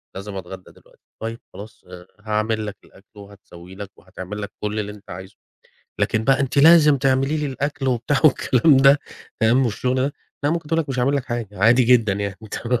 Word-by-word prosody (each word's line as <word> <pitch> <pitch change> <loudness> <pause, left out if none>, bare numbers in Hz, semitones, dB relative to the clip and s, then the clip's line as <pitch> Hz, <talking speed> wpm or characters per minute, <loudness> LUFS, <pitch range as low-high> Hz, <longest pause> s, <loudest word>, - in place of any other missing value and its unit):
لازم 100 +1 -7
أتغدى 95 0 -9
دلوقتي، - - -24 0.2
طيّب 115 +1 -5
خلاص 105 +2 -12
آآ 90 0 -12
هاعمل 110 +1 -2
لك 100 -2 -7
الأكل 100 +3 -22
وهتسوي 95 -3 -14
لك 100 0 -9
وهتعمل 95 +2 -9
لك 100 - -6
كل 105 +1 -2
اللي 105 0 -4
أنت 105 0 -16
عايزه. 95 +2 -9 0.7
لكن 110 0 0
بقى، 135 0 +3
"أنتِ 135 +1 -1
لازم 155 -1 +6
تعملي 135 +3 +1
لي 150 -1 -2
الأكل." 140 0 -3
وبتاع، 125 +3 0
والكلام 135 0 +4
ده 135 +2 +6 0.4
فاهم 120 +4 +3
والشغل 125 +2 -1
ده؟ 135 +2 0 0.3
لا، 145 - +2
ممكن 165 -2 -3
تقول 165 0 +1
لك: 155 - -6
"مش 130 -2 -4
هاعمل 135 +3 +1
لك 135 - -3
حاجة." 120 -4 -4
عادي 115 +5 +4
جدًا 115 -4 +3
يعني. 100 0 -4
تمام؟ 125 0 -2
115 Hz, 195 wpm, -21 LUFS, 100-135 Hz, 0.7 s, لازم